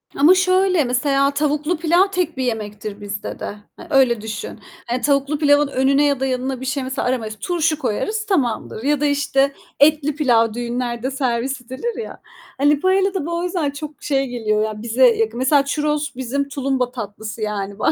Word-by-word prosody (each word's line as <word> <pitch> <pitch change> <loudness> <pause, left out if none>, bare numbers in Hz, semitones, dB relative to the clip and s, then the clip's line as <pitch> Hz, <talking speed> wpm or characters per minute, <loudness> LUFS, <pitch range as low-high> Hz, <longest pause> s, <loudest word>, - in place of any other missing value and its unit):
Ama 300 +6 +6
şöyle, 370 -2 +3
mesela 275 +2 +1
tavuklu 300 +3 0
pilav 345 +4 +3
tek 355 -5 -1
bir 260 - -1
yemektir 210 -3 -4
bizde 200 0 -6
de. 205 - -5 0.2
E, - - -9
öyle 255 -6 +3
düşün. 220 0 -6 0.3
Hani 245 +2 -1
tavuklu 280 +1 +1
pilavın 290 -1 +4
önüne 275 +1 +2
ya 280 -2 +1
da 270 - 0
yanına 260 0 -2
bir - - -5
şey 270 +1 -1
mesela 260 -1 -2
aramayız, 225 -4 -2
turşu 325 -3 0
koyarız 425 - -2
tamamdır 250 - -1
ya 290 +1 +1
da - - +2
işte 280 -1 +1 0.3
etli 300 0 +4
pilav 230 -7 +3
düğünlerde 240 +1 -3
servis 260 0 -1
edilir 260 - -5
ya. - - -10 0.4
Hani 290 +1 +3
paella 380 +2 +2
da 375 -7 -2
bu 340 +1 -2
o - - -3
yüzden 345 -5 -1
çok 300 +1 -9
şey 275 -2 0
geliyor 215 -3 0
ya 215 -1 -4
bize 235 +3 +4
yakın. 225 -1 +1
Mesela 275 +2 +3
churros 295 0 -1
bizim 270 +3 -2
tulumba 265 -3 -1
tatlısı 215 -2 -7
yani 205 -1 -3
baktığında. - - +3
270 Hz, 185 wpm, -20 LUFS, 235-300 Hz, 0.4 s, Ama